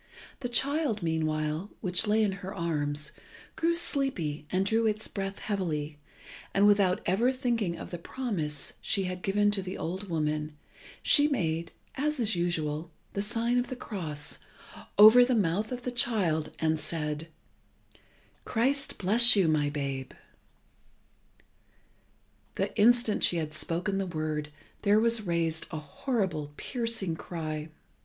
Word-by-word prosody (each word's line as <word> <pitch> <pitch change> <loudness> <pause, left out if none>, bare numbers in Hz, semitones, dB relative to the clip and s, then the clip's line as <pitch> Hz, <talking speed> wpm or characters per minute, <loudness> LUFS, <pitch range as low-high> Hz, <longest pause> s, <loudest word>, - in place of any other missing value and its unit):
The 245 - -4
child, 265 - +1
meanwhile, 155 +2 -1
which 185 +2 +1
lay 215 +1 +3
in 205 - +1
her 190 +1 -6
arms, 150 -2 -2 0.4
grew 335 +1 +1
sleepy 185 - -1
and 185 +1 +1
drew 225 +2 +2
its 215 0 -1
breath 195 -1 -4
heavily, 155 -7 -3 0.6
and 200 +1 +5
without 200 -3 +4
ever 220 +8 +2
thinking 235 -9 -1
of - - -8
the 175 - -5
promise 170 - -3
she 200 -1 +1
had 180 0 -4
given 205 +2 +2
to 200 -1 0
the 185 0 -6
old 190 +4 -5
woman, 150 -2 -2 0.5
she 290 -1 +5
made, 170 - -1 0.2
as 300 +1 -1
is 220 -4 +2
usual, 160 -2 -1 0.2
the 200 - -1
sign 235 +3 0
of 245 - -2
the 255 - -5
cross 160 -11 -4 0.6
over 220 +4 +9
the 250 0 +2
mouth 205 +2 0
of 250 -1 -5
the 250 - -2
child, 190 -11 +1
and 160 -1 +1
said 150 0 -2 1.2
"Christ 270 +5 0
bless 225 +6 +7
you, 195 -4 +3
my 150 -2 +2
babe!" 140 -3 -4 2.4
The - - -2
instant 235 0 +4
she 175 - +4
had 155 -2 -3
spoken 175 +5 -2
the 195 - -2
word 155 -3 -3 0.3
there 205 0 +4
was 230 0 +3
raised 165 -2 -1
a 160 - -5
horrible, 155 - -3
piercing 230 -8 -1
cry. 155 -3 -5
190 Hz, 140 wpm, -29 LUFS, 155-225 Hz, 2.4 s, over